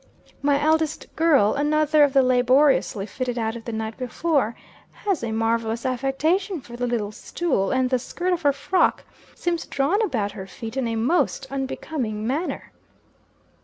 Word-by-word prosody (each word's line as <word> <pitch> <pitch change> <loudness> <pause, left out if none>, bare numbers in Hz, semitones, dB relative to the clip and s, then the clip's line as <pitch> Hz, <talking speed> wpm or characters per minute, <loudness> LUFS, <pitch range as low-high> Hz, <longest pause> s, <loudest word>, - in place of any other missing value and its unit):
My 280 0 +3
eldest 315 +1 0
girl 290 -10 +4
another 300 +1 +3
of 285 - +4
the 270 -1 +5
laboriously 255 -3 +3
fitted 250 +2 -4
out 225 -1 -1
of 230 - -9
the 235 - -4
night 220 0 -4
before, 255 -2 0 0.4
has 395 - -2
a 230 - -2
marvellous 225 +1 -1
affection 295 +9 0
for 240 -3 -11
the 245 +1 -2
little 220 -4 -1
stool, 215 - -1
and 260 -1 +2
the 255 - +2
skirt 360 +8 -2
of 345 - -2
her 285 - +4
frock 290 +7 +1 0.3
seems 340 -1 -2
drawn 305 +11 +1
about 220 - 0
her 195 -2 -8
feet 225 +5 -8
in 265 -3 0
a 230 - -2
most 265 +4 +1
unbecoming 265 -5 -3
manner. 290 +9 -3
265 Hz, 165 wpm, -24 LUFS, 230-305 Hz, 0.4 s, the